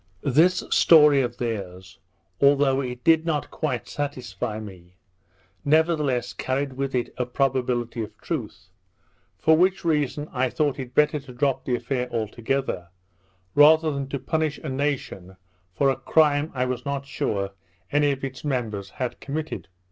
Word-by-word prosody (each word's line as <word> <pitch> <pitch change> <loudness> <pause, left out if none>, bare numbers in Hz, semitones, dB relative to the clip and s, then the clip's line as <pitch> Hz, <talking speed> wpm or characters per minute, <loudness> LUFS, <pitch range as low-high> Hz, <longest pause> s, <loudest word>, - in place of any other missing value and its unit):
This 165 +7 +3
story 150 -4 +6
of 120 -1 -3
theirs, 95 -6 -5 0.4
although 140 -1 +4
it 125 -2 -6
did 160 -1 +5
not 160 -3 -2
quite 130 -8 -3
satisfy 125 -6 -4
me, 90 -4 -11 0.7
nevertheless 150 -4 +2
carried 135 +1 -2
with 135 0 -3
it 120 - -2
a 125 - +1
probability 125 -3 -1
of 110 0 -7
truth; 110 - -5 0.7
for 160 +8 +4
which 185 +2 +2
reason 150 -2 0
I 130 0 +1
thought 145 0 0
it 125 -1 -7
better 150 0 +3
to 135 -2 -12
drop 135 +1 0
the 125 - +1
affair 125 +1 -2
altogether, 115 -3 -2 0.6
rather 155 +2 +6
than 140 -1 -3
to 140 - -3
punish 155 +2 -1
a 155 - -4
nation 130 -9 -3 0.3
for 135 +9 +2
a - - -1
crime 145 +2 +2
I 125 0 +1
was 125 -1 -3
not 140 -1 -3
sure 100 -7 -2 0.4
any 145 0 +3
of 135 -1 -5
its 130 -1 -5
members 110 -9 -2
had 125 +4 -4
committed. 155 +2 -5
135 Hz, 150 wpm, -24 LUFS, 120-145 Hz, 0.7 s, story